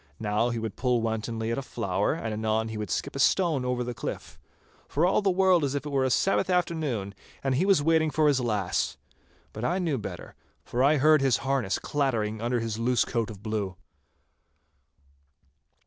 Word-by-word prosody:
Now 105 +2 +1
he 120 - -2
would 110 -2 -4
pull 125 -2 +1
wantonly 110 0 -2
at 115 - -1
a - - -3
flower, 130 - -1
and 110 -1 -4
anon 110 +1 -1
he 110 - -5
would 105 -3 -4
skip - - -3
a - - -4
stone 160 -2 +2
over 125 -1 -1
the 120 0 -4
cliff—for 145 +5 -5
all 185 - +3
the 200 - +2
world 185 -2 +4
as 140 0 -1
if 140 - -3
it 145 - -5
were 135 -1 +2
a - - +1
Sabbath 190 +9 +2
afternoon, 155 - -1 0.3
and 135 -1 +1
he 165 +9 +1
was 190 -7 +4
waiting 160 0 +3
for 155 +1 +2
his 140 -3 +3
lass. 105 -6 -1 0.6
But 110 - -6
I 175 +8 +1
knew 165 -8 -1
better, - - -7 0.3
for 125 +2 0
I 150 +3 +4
heard 155 +1 +5
his 135 -4 +3
harness 130 -8 0
clattering 110 -7 -1
under 120 +1 0
his 115 -1 -3
loose 120 +1 +2
coat 115 -3 -2
of 105 -2 -10
blue. 105 -4 -2
125 Hz, 195 wpm, -27 LUFS, 110-150 Hz, 0.6 s, heard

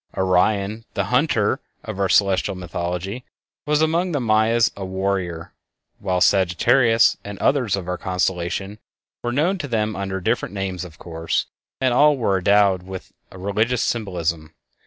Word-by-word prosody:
Orion, 100 +3 +1
the 100 - +1
"Hunter" 125 -6 +2 0.2
of 95 - -6
our 95 -1 +1
celestial 100 -1 +2
mythology, 90 +5 -4 0.4
was 150 +1 +3
among 170 +3 +1
the 145 - +1
Mayas 115 0 +3
a 100 - -6
"Warrior," 95 -3 -3 0.5
while 95 -2 -1
Sagittarius 115 +6 +4
and 100 -1 -7
others 125 -4 +1
of 95 -3 -6
our 90 0 -3
constellations 95 +2 -2 0.4
were 120 - -2
known 170 +9 +1
to 145 - -4
them 110 -3 -1
(under 95 -1 -3
different 110 +1 -1
names, 95 -2 -3
of 80 -4 -11
course), 80 -1 -2 0.3
and 130 -2 +2
all 145 +3 +5
were 100 -6 +1
endowed 100 -1 +3
with 95 0 -9 0.2
a - - -13
religious 110 +6 0
symbolism. 85 -8 -2
100 Hz, 150 wpm, -22 LUFS, 90-115 Hz, 0.5 s, all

